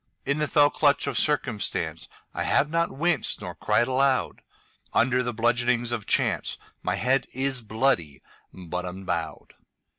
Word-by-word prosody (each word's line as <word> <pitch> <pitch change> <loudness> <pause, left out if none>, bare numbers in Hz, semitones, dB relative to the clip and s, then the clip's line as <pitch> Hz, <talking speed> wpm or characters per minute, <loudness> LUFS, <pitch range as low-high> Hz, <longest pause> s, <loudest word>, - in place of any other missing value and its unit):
In 140 +2 0
the 150 - +1
fell 145 -1 +4
clutch 145 -1 +2
of 140 -3 -3
circumstanceI 125 -6 0 0.4
have 150 - +2
not 165 0 +1
winced 160 +2 0
nor 90 -4 -6
cried 105 +5 +1
aloud. 130 0 +1 0.5
Under 125 +2 +3
the 120 -1 -2
bludgeonings 120 +1 +1
of 115 -4 -3
chanceMy - - -1
head 130 +3 +1
is 130 -1 +1
bloody, 110 - -1 0.3
but 90 -1 -5
unbowed. 90 -2 -5
125 Hz, 130 wpm, -26 LUFS, 105-140 Hz, 0.5 s, fell